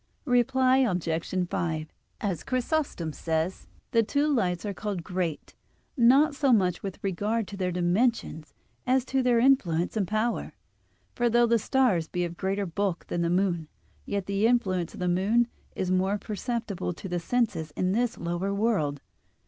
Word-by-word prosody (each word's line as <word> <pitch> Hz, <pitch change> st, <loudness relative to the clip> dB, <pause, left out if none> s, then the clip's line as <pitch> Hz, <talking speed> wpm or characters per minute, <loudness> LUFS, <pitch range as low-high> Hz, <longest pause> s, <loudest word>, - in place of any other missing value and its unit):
Reply 255 Hz, 0 st, +3 dB
Obj. 180 Hz, -5 st, 0 dB
5: 160 Hz, -3 st, -2 dB, 0.3 s
As 190 Hz, -7 st, -2 dB
Chrysostom 255 Hz, -, -1 dB
says, 160 Hz, +4 st, -2 dB, 0.2 s
the 230 Hz, -, +4 dB
two 285 Hz, +7 st, +1 dB
lights 180 Hz, -6 st, 0 dB
are 205 Hz, -, -2 dB
called 200 Hz, -3 st, -4 dB
great, 180 Hz, -3 st, -3 dB, 0.4 s
not 275 Hz, +4 st, +5 dB
so 280 Hz, -1 st, +2 dB
much 185 Hz, -6 st, +2 dB
with 195 Hz, -2 st, -5 dB
regard 205 Hz, +3 st, -1 dB
to 205 Hz, -, -7 dB
their 185 Hz, -2 st, -1 dB
dimensions 175 Hz, -, 0 dB, 0.3 s
as 260 Hz, 0 st, +3 dB
to 265 Hz, 0 st, 0 dB
their 250 Hz, -2 st, +3 dB
influence 215 Hz, -10 st, +2 dB
and 205 Hz, -4 st, 0 dB
power. 215 Hz, +3 st, -1 dB, 0.6 s
For 240 Hz, 0 st, +1 dB
though 240 Hz, +1 st, +4 dB
the 230 Hz, 0 st, +3 dB
stars 215 Hz, -, +2 dB
be 175 Hz, +2 st, -1 dB
of 170 Hz, 0 st, -6 dB
greater 195 Hz, +2 st, -1 dB
bulk 185 Hz, 0 st, -2 dB
than 175 Hz, -, -1 dB
the 170 Hz, -, +1 dB
moon, 175 Hz, -3 st, +1 dB, 0.4 s
yet 200 Hz, -2 st, -2 dB
the 200 Hz, +3 st, +1 dB
influence 185 Hz, -8 st, 0 dB
of -, -, -10 dB
the 180 Hz, -, 0 dB
moon 200 Hz, +7 st, +2 dB, 0.3 s
is 185 Hz, -1 st, -1 dB
more 190 Hz, +2 st, +2 dB
perceptible 210 Hz, -3 st, -3 dB
to 190 Hz, -, -8 dB
the 175 Hz, -1 st, -2 dB
senses 170 Hz, -6 st, -1 dB
in 185 Hz, 0 st, 0 dB
this 235 Hz, +3 st, 0 dB
lower 175 Hz, +3 st, -2 dB
world. 200 Hz, -10 st, 0 dB
200 Hz, 165 wpm, -27 LUFS, 175-240 Hz, 0.6 s, not